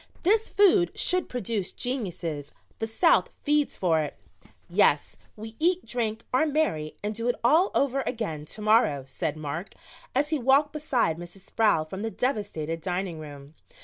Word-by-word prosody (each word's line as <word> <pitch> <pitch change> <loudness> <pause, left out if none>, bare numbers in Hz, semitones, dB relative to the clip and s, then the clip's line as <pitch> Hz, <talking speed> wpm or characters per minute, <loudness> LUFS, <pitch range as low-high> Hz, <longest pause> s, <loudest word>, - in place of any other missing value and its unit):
"This 425 +5 +3
food 395 -3 +4
should 365 -2 0
produce 225 -5 -2
geniuses. 175 - -4 0.3
The 225 - -1
South 325 +10 +3
feeds 295 -1 +1
for 165 -4 +2
it." 150 -2 -3 0.5
"Yes, - - +2 0.2
we 220 +1 -9
eat, 360 +3 +2
drink, 225 -2 -2
are 315 +5 +3
merry 280 - 0
and 210 +1 -1
do 230 +2 -3
it 245 - +2
all 320 +10 +5
over 275 -1 +2
again 165 - -3
to 215 - -9
morrow," 215 - +3
said 135 +3 -3
Mark, 155 +5 -5 0.4
as 290 +3 +2
he 310 -2 0
walked 275 +4 +3
beside 255 - 0
Mrs. 175 +2 -10
Sproul 210 -8 +2
from 190 +5 -7
the 225 - -2
devastated 200 - -2
dining 180 -2 -3
room. 145 -1 -10
220 Hz, 160 wpm, -27 LUFS, -, 0.5 s, all